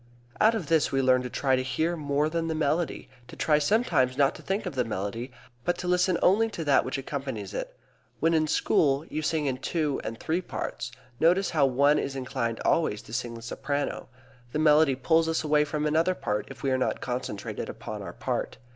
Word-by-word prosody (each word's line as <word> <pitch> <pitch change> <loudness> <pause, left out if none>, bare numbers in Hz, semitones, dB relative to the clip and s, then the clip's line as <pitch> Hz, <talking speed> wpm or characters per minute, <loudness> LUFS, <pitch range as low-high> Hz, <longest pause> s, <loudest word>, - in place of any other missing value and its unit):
Out 220 +2 +5
of 205 -7 -3
this 160 0 +2
we 135 - +1
learn 130 -1 +4
to 125 - -5
try 135 +1 +1
to 130 - 0
hear 160 +6 -1
more 145 -1 0
than 165 +1 -2
the 160 - -1
melody, 155 +2 -1 0.2
to - - -11
try 150 -1 +2
sometimes 145 - +2
not 140 -1 +4
to - - -11
think 195 +2 -2
of - - -4
the 130 -2 +1
melody, 115 +3 -4 0.3
but 175 - 0
to 180 - -5
listen 180 0 +3
only 220 +5 +4
to 170 -6 -5
that 145 -3 +4
which 130 - -3
accompanies 135 -7 -5
it. - - -5 0.4
When, 165 +2 +2
in 155 -1 +2
school, 145 -1 +2
you 155 - -3
sing 155 0 0
in 130 -2 -1
two 150 -5 -1
and 115 0 -5
three 165 +3 -1
parts, - - -5 0.3
notice 180 +4 +3
how 145 -4 +3
one 140 +3 +3
is 135 - -3
inclined 120 -3 -2
always 155 -11 +1
to 110 - -12
sing 120 -1 -3
the 115 - -10
soprano. 140 +5 -3 0.4
The - - 0
melody 155 -2 +5
pulls 160 +5 +2
us 160 0 0
away 150 -1 +3
from 150 0 -2
another 160 +4 +2
part 105 -8 -2
if - - -11
we 135 - +1
are 130 - +1
not - - 0
concentrated 125 -5 -4
upon - - -6
our - - -7
part. - - -3
145 Hz, 215 wpm, -27 LUFS, 130-165 Hz, 0.4 s, Out